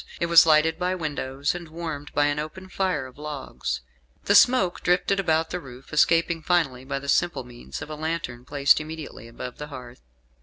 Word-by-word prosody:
It - - +1
was 170 -1 +7
lighted 160 +1 +4
by 180 +1 0
windows, 145 -4 -2
and 175 -1 -7
warmed 160 -3 -6
by 145 - +4
an 145 0 0
open 185 +5 -7
fire 185 -8 -1
of 130 +2 -13
logs. 140 - -4 0.4
The 200 - +2
smoke 205 -5 +5
drifted 180 +2 +2
about 160 -3 +1
the 180 - -2
roof, 130 -2 -13
escaping 165 +2 +3
finally 155 -7 +1
by 140 +1 -3
the 140 +1 -7
simple 175 0 +1
means 120 - -9
of - - -10
a - - -4
lantern 155 -6 -4
placed 140 +3 +3
immediately 155 -7 -8
above 125 +2 -8
the 150 - -5
hearth. 125 -4 -10
155 Hz, 190 wpm, -25 LUFS, 135-170 Hz, 0.4 s, was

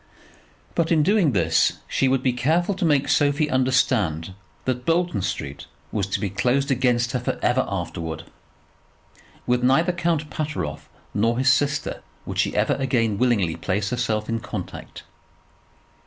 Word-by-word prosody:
But 170 -1 0
in 155 -2 +4
doing 190 -4 +3
this 80 -4 +3
she 135 - +1
would 130 0 +1
be 130 - +2
careful 160 +10 +1
to 185 -2 -2
make 145 -3 +2
Sophie 145 +1 +2
understand 125 - +1 0.3
that 125 -1 -1
Bolton 165 - +1
Street 80 -7 -4 0.2
was 100 -3 -1
to 100 - -2
be 105 - -1
closed 130 +8 0
against 120 -2 +2
her 125 - -1
for 120 - -2
ever 125 +1 +3
afterwards. 85 -4 -4 1.2
With 125 0 +1
neither 155 +8 +4
Count 170 -4 -1
Pateroff 155 -1 -4 0.2
nor 115 +3 +1
his 130 0 +5
sister 140 +3 -1 0.2
would - - -4
she - - +1
ever - - +2
again 115 -6 0
willingly 105 -10 +2
place 100 +2 -2
herself 115 -4 -1
in 115 0 -1
contact. - - -7
125 Hz, 150 wpm, -23 LUFS, 105-145 Hz, 1.2 s, his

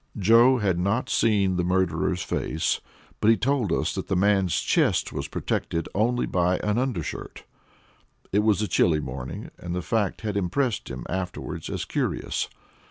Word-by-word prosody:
Joe 115 +6 +6
had 95 -6 0
not 100 +7 0
seen 100 -5 +2
the 90 - +1
murderer's 95 0 0
face, 80 - -1 0.4
but 105 - +3
he 115 - +6
told 130 - 0
us - - 0
that - - -4
the - - 0
man's 95 -1 +2
chest - - +1
was - - -3
protected 85 0 -2
only 120 +4 +1
by 90 0 +1
an 105 +2 +1
undershirt. 125 - -4 0.9
It 100 - +3
was 105 0 +2
a - - 0
chilly 80 -5 +3
morning, 65 -2 -6
and 85 0 -5
the 90 - -2
fact 105 +3 -1
had 105 -2 -3
impressed 105 +6 -1
him 65 -1 -6
afterward 90 -1 -4
as - - -3
curious. - - -2
100 Hz, 165 wpm, -25 LUFS, 90-110 Hz, 0.9 s, Joe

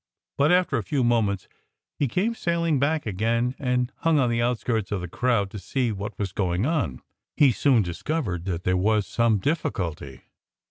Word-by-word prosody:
But 145 +3 +3
after 180 0 +3
a - - -2
few 140 -4 0
moments 110 -5 +1 0.5
he 145 - +2
came 195 - 0
sailing 170 - 0
back 150 +3 +1
again 115 +4 0
and 125 -2 0
hung 165 -2 +2
on 125 -4 +2
the 115 0 +1
outskirts 120 -3 -1
of 100 - 0
the 90 - -5
crowd, 105 0 0
to 105 - -6
see 120 +6 -1
what 100 0 -6
was 100 -3 -2
going 95 +1 0
on. 130 - -1 0.3
He 140 -3 +6
soon 120 -1 +3
discovered 90 - -3
that 90 -2 -3
there 90 +1 +1
was 105 +2 +2
some 115 -2 +2
difficulty. 95 - -3
115 Hz, 180 wpm, -25 LUFS, 100-140 Hz, 0.5 s, He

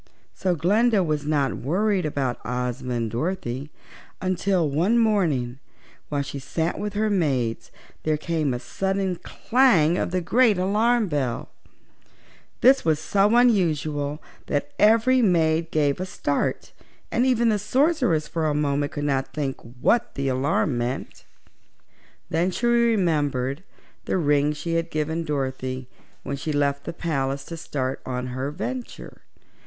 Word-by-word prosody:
So 185 -2 0
Glinda 205 +6 +3
was 150 -3 -1
not 145 -4 +1
worried 185 - 0
about 135 -4 -2
Ozma 125 0 -3
and 115 -2 -2
Dorothy 140 - -3 0.5
until 185 -2 +1
one 170 +11 +2
morning, 160 - +1 0.5
while 145 -1 -1
she 140 0 -6
sat 160 +5 -2
with 205 -1 -3
her 215 +1 0
maids, 135 - 0 0.3
there 155 -1 0
came 155 -2 -1
a 125 - -1
sudden 190 +5 -2
clang 185 - +2
of - - -1
the 185 +1 0
great 220 +4 +3
alarm 215 +5 +2
bell. 140 -7 -2 1.1
This 265 +2 +6
was 160 -2 +2
so 200 +7 +2
unusual 155 - +2 0.2
that 145 0 -1
every 230 +4 +5
maid 165 -5 +2
gave 145 -2 +1
a 185 - -3
start 145 -5 -2 0.4
and 240 - +2
even 240 -3 +3
the 210 -1 +1
Sorceress 250 - +1
for 165 -2 -1
a 150 - 0
moment 145 -1 0
could 145 - -3
not 135 -2 -1
think 140 -3 -3
what 125 - 0
the 140 -1 -1
alarm 130 0 +1
meant. 125 +3 -4 1.1
Then 170 +3 +2
she 215 +6 -3
remembered 165 - +1 0.4
the - - 0
ring 145 -3 +2
she 155 +3 -4
had 165 0 -2
given 160 +2 -2
Dorothy 130 -3 -3 0.4
when 140 - -4
she 155 +3 -3
left 140 -1 0
the - - -3
palace 140 -5 -2
to 165 - -7
start 135 -5 -3
on 125 -1 -3
her 130 +2 -2
venture. 235 - -6
155 Hz, 145 wpm, -24 LUFS, 140-195 Hz, 1.1 s, This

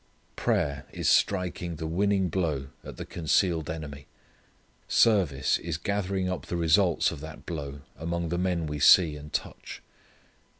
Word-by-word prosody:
Prayer 70 0 -1
is - - -3
striking 90 -3 +1
the 80 +1 -5
winning 95 +3 +1
blow 75 -7 -2
at - - -9
the - - -6
concealed 80 0 0
enemy. 75 -3 -7 0.8
Service 90 - +3
is 85 -3 -3
gathering 100 0 -1
up 90 0 -4
the 85 - -2
results 85 +1 +3
of - - -7
that 80 0 -10
blow 70 -5 -6
among 85 +2 -3
the 85 +1 -1
men 90 -3 0
we 75 -1 -4
see 80 +1 +6
and 75 +1 -10
touch. - - -5
85 Hz, 145 wpm, -27 LUFS, 75-90 Hz, 0.8 s, see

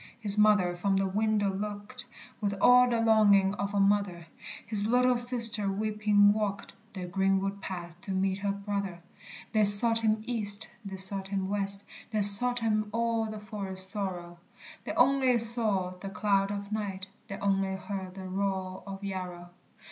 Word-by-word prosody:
His 205 -3 -2
mother 210 -4 +1
from 195 +2 -2
the 195 - -1
window 205 0 -2
looked 210 +5 -8 0.4
With 200 -1 -3
all 250 +3 +4
the 235 -1 -2
longing 205 -4 +2
of 200 0 -6
a - - 0
mother; 195 -4 -1 0.4
His 210 0 +2
little 250 +2 +1
sister 230 -4 +6
weeping 210 0 +1
walked 210 -2 -5 0.2
The 185 -1 -7
greenwood 195 +2 -2
path 175 -3 -9
to 195 - -9
meet 190 0 -2
her 200 0 -3
brother. 200 -3 -6 0.5
They 215 -1 +1
sought 220 +3 +6
him 220 -1 -2
east, 210 -4 0
they 195 -2 -9
sought 190 0 +1
him 195 -1 -4
west, 200 0 -1 0.2
They 215 -1 -3
sought 240 +5 +8
him 215 -2 -2
all 230 0 -2
the 215 0 -8
forest 195 -2 -2
thorough, 180 -4 -7 0.5
They - - -5
only 260 -1 +1
saw 220 -5 +3
the 185 +2 -10
cloud 195 0 -1
of 200 0 -7
night, 200 -3 -5 0.2
They 195 - -8
only 195 -1 -2
heard 190 -1 -8
the 190 -1 -9
roar 190 -1 -5
of 195 0 -10
Yarrow! 180 -3 -8
200 Hz, 165 wpm, -27 LUFS, 195-215 Hz, 0.5 s, sought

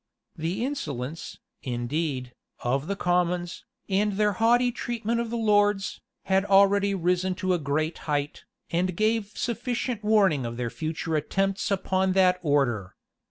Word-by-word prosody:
The 175 +9 -2
insolence, 155 - -5 0.2
indeed, 125 +1 -3 0.3
of 135 +5 0
the 200 - -1
commons, 175 -1 0 0.2
and 205 +1 +1
their 210 +1 +2
haughty 240 +4 +3
treatment 235 -1 -2
of 235 - -4
the 235 - -2
lords, 205 -3 +2 0.2
had 190 0 +2
already 200 0 +4
risen 180 +1 0
to 185 -1 0
a 175 - +1
great 155 +2 -1
height, 145 0 -1 0.3
and 180 +1 0
gave 215 -1 +1
sufficient 240 -1 -2
warning 200 -10 +3
of 115 0 -5
their 120 -2 -2
future 160 0 -3
attempts 195 +6 0
upon 190 -1 +1
that 185 -1 +4
order. 130 - 0
185 Hz, 140 wpm, -26 LUFS, 155-210 Hz, 0.3 s, already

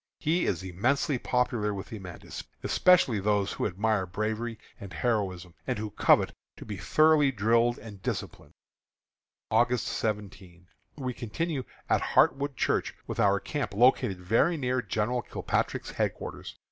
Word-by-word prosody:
He 170 +3 +1
is 90 -1 -1
immensely 125 - 0
popular 120 -5 0
with 95 - -7
the 110 - -7
men, 90 -3 -10 0.4
especially 175 -11 +4
with 100 - -4
those 105 -1 +1
who - - -1
admire 105 0 0
bravery 110 +4 -3 0.2
and 100 -1 -9
heroism, 95 -4 -1
and - - -1
who 105 0 -4
covet - - +3 0.2
to - - -10
be 105 - -5
thoroughly 150 - +4
drilled 115 +1 +2
and 105 -3 -11
disciplined. - - -5 1.0
August 120 0 +2
17. 95 -5 -4 0.3
We 130 -3 -3
continue 130 +4 -3 0.2
at - - +2
Hartwood 140 +1 +2
Church, - - 0
with - - -5
our 100 0 +4
camp 120 -4 -4
located 110 -5 +3
very 115 - +2
near 130 -2 0
General 120 +2 -1
Kilpatrick's - - -2
headquarters. - - -4
110 Hz, 145 wpm, -28 LUFS, 100-125 Hz, 1.0 s, especially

